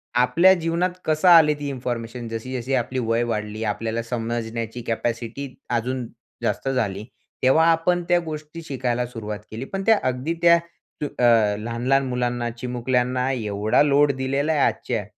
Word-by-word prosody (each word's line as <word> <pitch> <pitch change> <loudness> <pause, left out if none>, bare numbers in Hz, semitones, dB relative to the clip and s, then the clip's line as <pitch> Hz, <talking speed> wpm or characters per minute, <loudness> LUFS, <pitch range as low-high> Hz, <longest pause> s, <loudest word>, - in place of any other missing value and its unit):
आपल्या 170 +10 +5
जीवनात 170 +1 0 0.2
कसं 155 +3 +1
आले, 160 -3 +7
ती 145 -1 -6
इन्फॉर्मेशन 120 -2 -4
जशी-जशी 125 +3 -4
आपली 130 +1 -1
वय 115 0 +1
वाढली, 110 -1 -3
आपल्याला 110 +2 -2
समजण्याची 115 0 -4
कॅपॅसिटी 115 +3 -3 0.2
अजून 125 +1 -1 0.4
जास्त - - -1
झाली, 105 -6 -1 0.4
तेव्हा 145 +5 +5
आपण 175 +2 +1
त्या 175 - +5
गोष्टी 155 +1 -7
शिकायला 125 -4 -2
सुरुवात 105 -3 -6
केली. 115 +4 -5
पण 195 +6 -4
त्या 225 -2 +5
अगदी 130 +5 -1
त्या 170 0 +7 0.4
जो - - 0
अ, - - +1 0.4
लहान-लहान 120 +5 0
मुलांना, 120 -1 -1
चिमुकल्यांना 125 +2 -1
एवढा 105 -2 +1
लोड 145 0 +4
दिलेला 140 +3 0
आहे. 145 - +1
आजच्या 115 -5 0
125 Hz, 145 wpm, -23 LUFS, 115-145 Hz, 0.4 s, आले